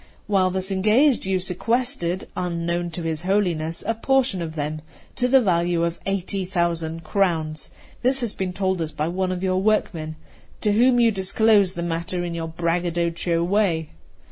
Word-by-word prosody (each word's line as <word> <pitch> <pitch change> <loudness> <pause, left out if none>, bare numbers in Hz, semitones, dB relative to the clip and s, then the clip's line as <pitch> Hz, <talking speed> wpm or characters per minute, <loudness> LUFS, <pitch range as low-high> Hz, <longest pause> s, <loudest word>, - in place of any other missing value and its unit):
While 195 -3 +2
thus 190 +1 -2
engaged, 215 +6 +3
you 190 -1 +1
sequestered, 190 0 -1
unknown 175 -1 -2
to 170 +1 -6
his 160 -2 -2
Holiness, 175 -4 0
a 225 - +1
portion 255 -4 +1
of 160 -1 -5
them, 155 0 -3 0.3
to 250 - +1
the 265 +1 +6
value 175 -5 +1
of 170 0 -2
eighty 195 0 -1
thousand 170 -3 -2
crowns. 160 -4 -1 0.3
This 260 +2 +2
has 235 -4 -1
been 190 -1 -3
told 190 -1 -1
us 155 -1 -3
by 155 +1 -2
one 185 +1 -1
of 180 0 -3
your 185 0 +1
workmen, 170 -7 0 0.5
to 210 - +2
whom 245 +3 +4
you 230 -1 +5
disclosed 200 0 +3
the 170 - -3
matter 170 +1 -2
in 175 -1 -3
your 165 -1 -3
braggadocio 170 0 -1
way. 175 -4 +1
180 Hz, 170 wpm, -23 LUFS, 170-200 Hz, 0.5 s, the